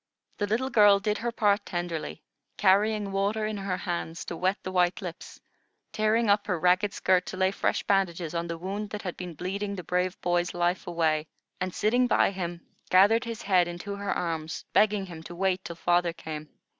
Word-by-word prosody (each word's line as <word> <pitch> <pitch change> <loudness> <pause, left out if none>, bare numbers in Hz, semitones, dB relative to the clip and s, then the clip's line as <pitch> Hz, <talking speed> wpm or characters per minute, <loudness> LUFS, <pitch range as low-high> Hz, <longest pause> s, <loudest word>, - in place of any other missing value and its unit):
The 205 - 0
little 250 +6 0
girl 205 -2 +6
did 210 +1 -1
her 235 +1 -2
part 205 -2 +2
tenderly, 170 -4 -4 0.3
carrying 205 +1 +3
water 200 +3 0
in 215 -1 -3
her 195 -2 -2
hands 170 -2 -4
to 170 - -5
wet 185 +4 0
the 185 - -4
white 180 -2 +2
lips, 175 -3 -8 0.5
tearing 215 +2 +2
up 205 0 +3
her 180 -4 0
ragged 180 +4 +3
skirt 185 -2 +2
to 185 - -6
lay 190 0 +2
fresh - - 0
bandages 175 -4 0
on 170 0 -2
the 170 0 -4
wound 200 +4 -4
that 210 0 -6
had 180 -3 -4
been 180 -3 -7
bleeding 200 +5 -3
the 180 - -6
brave 180 +2 -1
boy's 175 0 0
life 175 +2 0
away, 160 -3 +1 0.3
and, 185 0 -2
sitting 245 +4 +2
by 240 - +3
him, 175 -3 -5 0.2
gathered 205 +6 +5
his 230 -2 -6
head 185 -3 +3
into 175 +4 -5
her 200 0 -3
arms, 160 -2 -3
begging 210 -2 +3
him 170 -3 -9
to 175 +2 -9
wait 190 0 0
till 170 - -6
father 175 0 +1
came. 155 -2 -7
185 Hz, 195 wpm, -27 LUFS, 175-205 Hz, 0.5 s, girl